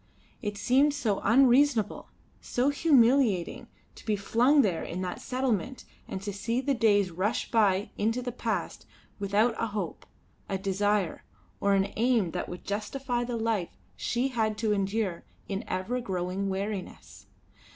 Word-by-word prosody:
It 205 -3 -4
seemed 275 +7 +3
so 220 -8 0
unreasonable, 250 -1 +3 0.3
so 250 +3 0
humiliating 255 - +3 0.3
to - - -14
be 215 -2 0
flung 245 +8 +3
there 185 -6 0
in 180 +2 -5
that 180 -1 -4
settlement 255 -1 -2 0.2
and 190 - -5
to 205 0 -4
see 230 +5 -1
the 275 +2 0
days 205 -6 +3
rush 190 +7 -1
by 205 -3 +2
into 225 +4 0
the 245 - -3
past, 220 -7 -3 0.3
without 205 +4 +2
a 230 - +1
hope, 200 -5 -5 0.4
a 195 - 0
desire, 195 -1 0 0.4
or 200 0 +3
an 195 +1 0
aim 225 -6 +2
that - - -4
would 180 - -8
justify 240 +5 -2
the 240 -1 -3
life 220 -6 -1 0.2
she 245 +3 -1
had 220 -4 -1
to 215 -2 +1
endure 195 -2 -1 0.2
in 200 +3 -3
ever 220 +7 -2
growing 190 -1 -2
weariness. 195 0 -5
215 Hz, 150 wpm, -28 LUFS, 195-245 Hz, 0.4 s, seemed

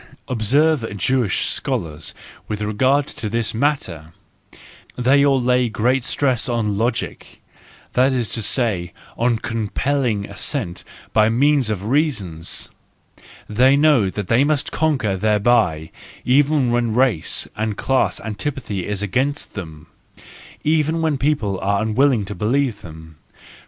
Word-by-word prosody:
Observe 125 0 +1
Jewish 125 -2 +1
scholars 85 - -3 0.3
with 105 - -4
regard 130 +7 +2
to 105 - -6
this 115 +1 -1
matter,—they 125 - -2
all 140 -2 +3
lay 125 -1 +2
great 120 +4 +1
stress 130 -2 0
on 110 -4 0
logic, 115 +5 -3 0.5
that 130 +2 +3
is 125 -3 0
to 115 - -3
say, 100 -7 0 0.2
on 120 0 +1
compelling 115 0 -1
assent 100 - -3 0.3
by 110 0 +4
means 135 +1 +2
of 100 -2 -3
reasons; 110 - -1 0.8
they 130 +6 +4
know 145 -9 +4
that 100 0 -5
they 120 +4 +3
must 145 -1 0
conquer 135 -11 0
thereby, 100 -6 +1 0.3
even 140 0 +3
when 120 -2 0
race 125 -10 +1
and 110 -1 -2
class 135 -1 +1
antipathy 110 -3 -4
is 105 -1 -2
against 130 +8 -1
them, 80 -5 -8 0.8
even 155 +1 +1
where 155 -2 +1
people 130 -9 0
are 100 +1 0
unwilling 110 +1 +2
to 100 - -6
believe 115 +3 0
them. 80 -1 -12
115 Hz, 125 wpm, -20 LUFS, 105-135 Hz, 0.8 s, by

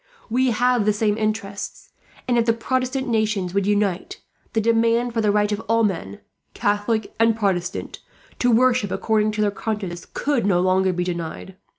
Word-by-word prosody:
We 255 +2 +2
have 245 -1 +2
the 210 - +3
same 210 0 +1
interests 215 -2 -4 0.4
and, 245 - +2
if 230 - +2
the 230 - +4
Protestant 255 +3 -1
nations 215 -5 0
would 200 0 +1
unite, 205 - 0 0.3
the 225 - +2
demand 230 +2 +2
for 225 - 0
the 210 - +2
right 210 0 +1
of 210 - -1
all 230 0 +3
men, 165 - -2 0.3
Catholic 205 +1 0
and 225 -1 +3
Protestant, 185 -4 -2 0.4
to 245 - +2
worship 245 -2 +3
according 215 +2 +1
to 210 - -1
their 205 -1 +2
consciences 200 -4 -4
could 285 -4 0
no 190 -3 +2
longer 185 +1 +2
be 180 0 -1
denied. 175 +1 -5
215 Hz, 175 wpm, -22 LUFS, 195-230 Hz, 0.4 s, the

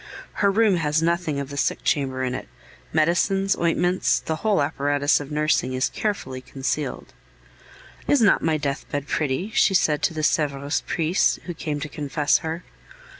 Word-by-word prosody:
Her 200 - +5
room 205 -2 +3
has 155 0 +1
nothing 170 -3 0
of 140 -1 -5
the 140 - -6
sick - - 0
chamber 130 -3 0
in 125 -1 -1
it; 130 - -5 0.4
medicines, 175 +5 +2
ointments, 175 +2 +1
the 160 - -3
whole 210 +2 +1
apparatus 145 0 +1
of 145 -1 -7
nursing, 150 -4 +1
is 130 +1 0
carefully 135 -12 -3
concealed. 135 +2 -4 0.9
"Is 290 - +4
not 220 -4 +4
my 160 -1 +1
deathbed 145 0 -3
pretty!" 155 +8 -1
she 195 - +3
said 150 -4 +2
to 170 - +1
the 155 - -3
Sevres 145 -1 0
priest 165 +3 +1
who 175 - -4
came 150 -2 -4
to 155 - -3
confess 145 0 0
her. 160 +2 -5
155 Hz, 165 wpm, -23 LUFS, 140-175 Hz, 0.9 s, Her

